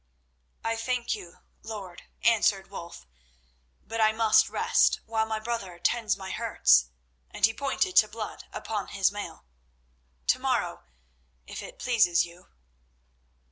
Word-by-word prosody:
"I 225 0 -1
thank 245 +1 -1
you, 180 -5 -9 0.2
lord," 200 -5 -8 0.2
answered 205 -4 +3
Wulf, 170 - -9 0.8
"but 225 0 -3
I 215 0 +5
must 220 -1 +4
rest - - +3
while 220 0 0
my 220 0 -2
brother 215 -6 -4
tends 215 +3 +1
my 190 -1 -7
hurts," 65 - +4 0.4
and - - +3
he 225 - +1
pointed 280 - -1
to 215 - +8
blood 215 0 -7
upon 210 -2 -4
his 195 -1 +1
mail. 200 - -7 0.8
"To - - +3
morrow, - - -1 0.6
if - - -7
it - - -10
pleases 220 -9 +3
you." 175 +1 -15
215 Hz, 135 wpm, -28 LUFS, 190-225 Hz, 0.8 s, to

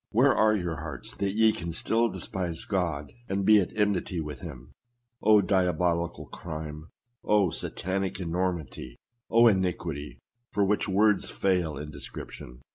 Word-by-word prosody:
Where 130 +4 +4
are 110 -1 +4
your 90 -5 -2
hearts, 70 -4 -6
that 100 0 -1
ye 110 0 +5
can 85 -4 -5
still 115 +7 +1
despise 90 -6 -2
God, 85 -7 -2 0.2
and 95 0 -1
be 110 0 +7
at 90 - -2
enmity 100 -4 0
with 75 -4 -5
him? - - -9 0.5
Oh! 105 -1 +6
diabolical 90 -3 0
crime! 75 -1 -7 0.4
Oh! 100 -5 +3
satanic 95 +1 -2
enormity! 85 -8 -3 0.3
Oh! 115 +1 +6
iniquity 90 -8 0 0.3
for 100 - +2
which 105 +1 +1
words 105 +2 +3
fail 90 -6 0
in 75 +1 -6
description 60 -3 -9
90 Hz, 140 wpm, -28 LUFS, 80-100 Hz, 0.5 s, be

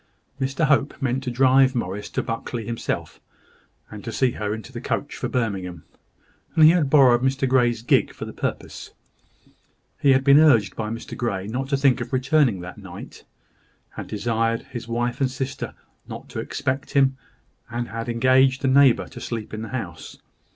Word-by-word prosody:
Mr 135 +4 0
Hope 145 -1 +1
meant 130 -1 -1
to 130 - -3
drive 130 +1 +4
Morris 105 -3 -3
to - - -2
Buckley 115 0 -4
himself, 115 +1 -4 0.7
and 105 -1 -9
to 115 - -5
see 130 +2 +1
her 105 -2 -4
into 110 -1 -6
the - - -6
coach - - -3
for - - -4
Birmingham; 95 -9 -3 0.7
and 160 - +5
he 155 - +9
had 165 -5 +1
borrowed 130 -5 +5
Mr 135 +1 +1
Grey's 120 -3 +2
gig - - +2
for - - -8
the - - -8
purpose. - - -5 1.1
He 140 -2 +5
had 130 0 +2
been 140 +1 +7
urged 140 -10 +4
by 110 -1 -3
Mr 115 +1 -6
Grey 100 -6 -2
not 130 +5 -4
to 140 - +1
think 135 -2 +3
of - - -6
returning 130 - +2
that 90 +1 -9
night, - - -11 0.7
had - - -8
desired 115 +2 -1
his 120 -2 -6
wife 120 +2 -2
and 135 - +2
sister 130 0 -5 0.3
not - - -9
to - - -5
expect 140 0 -3
him, 135 -2 +3 0.5
and 120 0 -4
had 115 +1 -5
engaged 130 +3 +3
a - - +3
neighbour 135 -2 +4
to - - -11
sleep 115 -3 -5
in 110 - -4
the 110 - -6
house. 95 -11 -6
125 Hz, 180 wpm, -23 LUFS, 115-135 Hz, 1.1 s, he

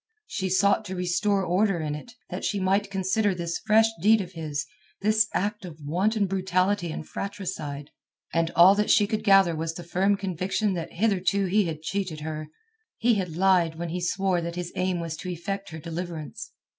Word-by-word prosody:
She 190 - -3
sought 200 +3 +3
to 190 -1 -5
restore 185 +2 +1
order 185 +1 +2
in 155 -2 -2
it, 150 +11 -8 0.2
that - - -4
she 205 - 0
might 195 +2 +1
consider 195 +1 +1
this 170 -1 -3
fresh 220 +1 +4 0.2
deed 220 +3 +5
of 185 -3 -5
his, 155 -4 -4 0.4
this 215 +1 +3
act 210 +2 -1
of 170 -4 -8
wanton 195 +9 +1
brutality 185 -1 0
and 155 - -6
fratricide. 155 -8 -5 0.4
And 165 0 +2
all 175 +3 +8
that 210 +1 0
she 210 - +5
could 215 +1 -2
gather 195 -5 +5
was 160 +1 -3
the 175 - -7
firm 190 +4 +1
conviction 195 +2 -1
that 170 -2 -5
hitherto 195 -1 +1
he 200 +2 +2
had 160 -2 -5
cheated 180 -3 -3
her; 155 0 -5 0.5
he 235 +1 +3
had 180 -6 -2
lied 180 -3 +3
when 170 +1 -4
he 180 +2 -3
swore 185 0 +1
that 170 0 -4
his 175 -1 -5
aim 185 -1 0
was 165 -1 -4
to 180 - -6
effect 195 +3 -4
her 160 - -7
deliverance. 170 +5 -6
185 Hz, 190 wpm, -26 LUFS, 170-200 Hz, 0.5 s, all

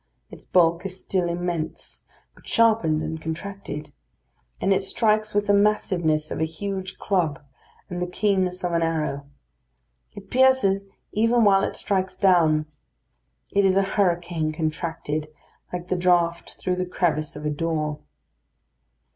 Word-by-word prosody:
Its - - -12
bulk 170 -1 +3
is 190 -1 -6
still 180 -3 -1
immense, 170 -2 -3 0.3
but - - -20
sharpened 215 -9 +3
and 160 0 -4
contracted; 160 -1 -6 0.7
and 195 - +3
it 190 - +1
strikes 215 +1 +1
with 205 0 +2
the 205 - +3
massiveness 180 -7 +2
of - - -3
a - - +1
huge 190 +3 -4
club 170 -8 0 0.5
and 180 0 -5
the 180 - -1
keenness 185 -1 0
of 180 - 0
an 170 0 +1
arrow. 155 -4 -1 0.9
It 200 -1 -11
pierces 250 -7 +4 0.3
even 230 +2 +3
while 195 -2 +5
it - - -2
strikes 190 -2 -1
down. 165 -5 +4 0.9
It 200 - +3
is 190 0 +3
a 195 - +4
hurricane 175 -5 +1
contracted, 155 -1 -3 0.4
like 180 0 -5
the - - +1
draught 175 -1 +1
through 180 -1 -1
the 185 0 -1
crevice 155 -4 -1
of 150 +1 -7
a 150 - 0
door. 155 -1 -2
180 Hz, 145 wpm, -24 LUFS, 160-195 Hz, 0.9 s, while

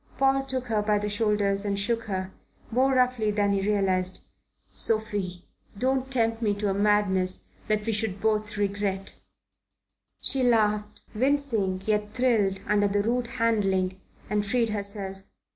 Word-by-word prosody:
Paul 270 0 +3
took 260 -1 -2
her 220 -3 0
by 210 0 +2
the 210 0 -2
shoulders 205 -2 +1
and 200 -1 -1
shook 230 +3 0
her, 190 -2 -3 0.4
more 260 +3 +3
roughly 250 -4 +2
than 205 -1 +1
he 195 - +1
realized. 190 -2 0 0.5
"Sophie, 205 -5 -1 0.3
don't 265 +2 0
tempt 230 -2 +1
me 210 -3 +1
to 205 -1 -1
a - - 0
madness 200 -2 +1 0.2
that 215 -1 0
we 225 - 0
should 210 -2 -1
both 215 0 0
regret." 200 -1 -2 1.0
She 270 - +2
laughed, 210 -3 +1
wincing 225 -7 0
yet 210 0 -1
thrilled, 220 -7 +2
under 205 0 +2
the 200 0 +1
rude 240 +2 0
handling, 195 -5 +1 0.3
and 210 0 0
freed 230 +2 +1
herself. 200 -2 -4
210 Hz, 145 wpm, -26 LUFS, 200-230 Hz, 1.0 s, Paul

